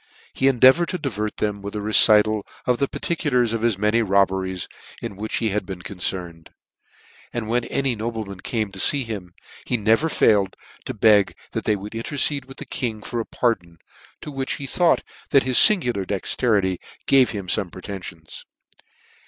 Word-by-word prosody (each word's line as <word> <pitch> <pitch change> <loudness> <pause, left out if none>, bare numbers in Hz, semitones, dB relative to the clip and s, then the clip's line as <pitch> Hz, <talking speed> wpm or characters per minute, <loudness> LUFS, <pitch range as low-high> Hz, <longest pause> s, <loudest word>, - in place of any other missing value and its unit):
He 135 - +1
endeavoured 135 +6 +5
to 180 - -2
divert 110 - -4
them 105 -1 -2
by 100 - -5
a - - -2
recital 110 0 +5 0.2
of 125 -1 +1
the 140 - +1
particulars 125 -10 0
of 115 -2 0
many 105 +3 +2
robberies 95 -3 0 0.3
in 100 - -6
which 110 +3 -4
he 115 - 0
had 105 0 -1
been 95 -1 -8
concerned, 90 -3 -5 0.8
and 120 -2 -4
when 120 +1 0
any 135 -3 -1
nobleman 110 -3 -5
came 110 -1 -3
to 95 - -8
fee 140 +7 +4
him, 100 -7 -7 0.3
he 125 - -1
never 110 +9 +2
failed 100 -9 +2 0.3
to - - -5
beg 105 -2 +4 0.2
that - - -4
they 105 - +2
would 105 +2 -8
intercede 140 +4 -2
with 135 0 -13
the - - -8
king 110 -5 -3
for 120 - -4
a 115 - -3
pardon, 90 -9 -1 0.4
to 150 - -7
which 135 -1 -3
he 140 - -6
thought 170 +6 +2 0.3
that 140 -2 +4
his 130 -1 +4
fingular 125 - +5
dexterity 100 -2 0 0.3
gave 135 -2 +5
him 100 -3 -5
fome 95 0 0
pretenfions. 90 -5 -9
110 Hz, 170 wpm, -22 LUFS, 100-125 Hz, 0.8 s, endeavoured